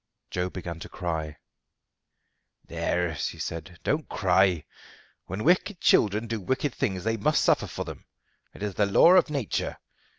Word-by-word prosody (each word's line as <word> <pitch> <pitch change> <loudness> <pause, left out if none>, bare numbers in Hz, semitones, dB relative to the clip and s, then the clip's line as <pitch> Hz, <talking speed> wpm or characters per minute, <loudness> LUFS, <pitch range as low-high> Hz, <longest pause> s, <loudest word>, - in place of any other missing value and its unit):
Joe 90 0 -1
began 85 -3 -6
to - - -9
cry. 80 -4 -4 1.3
"There," 90 -2 -1
she - - -3
said, 85 +2 -6
"don't 150 +1 -1
cry. 95 -4 +2 0.6
When 95 +4 -4
wicked 180 +3 +2
children 105 +1 +3
do 115 -2 -3
wicked 130 +7 -1
things 95 -3 -2
they 115 +1 0
must 150 +9 +2
suffer - - +3
for - - -5
them. - - -9 0.5
It - - -8
is 105 -2 -2
the 100 +2 +2
law 130 - +6
of 180 -3 +5
nature. 140 -8 -2
100 Hz, 155 wpm, -27 LUFS, 90-120 Hz, 1.3 s, law